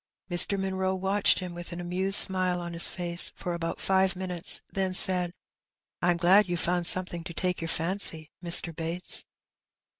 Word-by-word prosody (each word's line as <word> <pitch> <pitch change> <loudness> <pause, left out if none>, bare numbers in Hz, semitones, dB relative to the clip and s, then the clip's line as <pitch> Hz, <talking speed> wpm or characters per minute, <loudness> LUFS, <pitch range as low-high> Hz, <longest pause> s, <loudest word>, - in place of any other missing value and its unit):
Mr. 185 +3 +3
Munroe 190 0 -3
watched 195 +2 0
him 180 -2 -7
with 175 +1 -10
an 170 - -8
amused 185 +3 +2
smile 185 -2 +2
on 170 0 -8
his 170 - +6
face 175 -1 +2
for 175 - -6
about 165 -1 -6
five 190 0 0
minutes, 180 -2 -2
then 190 -1 -3
said 180 -2 +2 0.4
— - - -67
^'I'm 175 -1 0
glad 185 +3 +2
you've 175 -1 -3
found 175 0 -1
something 180 -2 +1
to 170 0 -10
take 180 -1 -4
your 165 - -5
fancy, 165 -2 0
Mr. 170 -1 +3
Bates.'' 165 +3 -1
180 Hz, 175 wpm, -26 LUFS, 170-190 Hz, 0.4 s, his